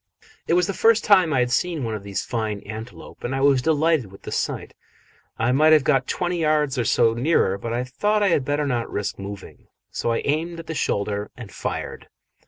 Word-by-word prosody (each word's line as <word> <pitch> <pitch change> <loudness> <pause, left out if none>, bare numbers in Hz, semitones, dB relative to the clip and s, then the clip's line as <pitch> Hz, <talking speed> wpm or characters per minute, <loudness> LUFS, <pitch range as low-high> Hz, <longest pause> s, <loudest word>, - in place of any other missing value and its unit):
It 170 - +3
was 180 0 +3
the 195 - -3
first 225 +2 +3
time 185 -6 +5
I 130 -3 +2
had 125 0 0
seen 165 +1 0
one 115 -2 -2
of 105 - -4
these 100 -1 -4
fine 110 -4 -3
antelope, 110 +3 -9
and 130 +2 -2
I 135 - -1
was 135 -2 +4
delighted 155 - +1
with 95 - -15
the - - -7
sight. - - -3 0.6
I 120 +2 +1
might 155 +4 +5
have 155 -3 +5
got 135 -2 +2
twenty 175 -1 -1
yards 150 -4 +1
or 120 - 0
so 115 0 +3
nearer, 120 - +2
but 115 +3 -5
I 120 +2 -1
thought 205 +12 0
I 200 - +3
had 150 - +2
better 145 +2 -1
not 120 -4 -2
risk 100 -1 -3
moving, 100 0 -9 0.2
so 115 - -1
I 115 - -1
aimed 165 +4 -1
at 165 - -8
the 160 - -5
shoulder 100 -7 -1
and 120 -5 -9
fired. - - -5
135 Hz, 220 wpm, -23 LUFS, 115-160 Hz, 0.6 s, time